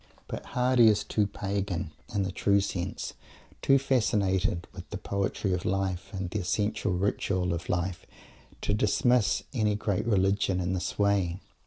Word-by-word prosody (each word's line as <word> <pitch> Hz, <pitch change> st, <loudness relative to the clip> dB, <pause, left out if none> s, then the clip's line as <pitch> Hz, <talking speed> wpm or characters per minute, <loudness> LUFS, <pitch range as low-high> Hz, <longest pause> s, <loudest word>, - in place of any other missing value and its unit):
But -, -, -5 dB
Mr. -, -, -13 dB
Hardy 125 Hz, -2 st, +4 dB
is 105 Hz, -1 st, +4 dB
too 105 Hz, -1 st, +1 dB
pagan, 95 Hz, -4 st, -3 dB, 0.2 s
in 100 Hz, -2 st, 0 dB
the 95 Hz, -, -2 dB
true 100 Hz, +2 st, +3 dB
sense, 95 Hz, -1 st, -3 dB, 0.5 s
too 135 Hz, -, +5 dB
fascinated 105 Hz, -8 st, +1 dB
by 90 Hz, -, -7 dB
the 105 Hz, -, -4 dB
poetry 100 Hz, 0 st, -1 dB
of 90 Hz, -, -1 dB
life 95 Hz, -2 st, -1 dB
and 95 Hz, -3 st, -3 dB
the 105 Hz, -, -1 dB
essential 105 Hz, +2 st, 0 dB
ritual 90 Hz, -1 st, 0 dB
of 85 Hz, +1 st, -5 dB
life, 90 Hz, 0 st, -2 dB, 0.5 s
to -, -, 0 dB
dismiss 110 Hz, +2 st, +2 dB
any 105 Hz, -4 st, +1 dB
great 105 Hz, +1 st, -1 dB
religion 95 Hz, -2 st, +2 dB
in 90 Hz, 0 st, -1 dB
this 90 Hz, -, -3 dB
way. 100 Hz, -3 st, +2 dB
100 Hz, 160 wpm, -28 LUFS, 90-105 Hz, 0.5 s, too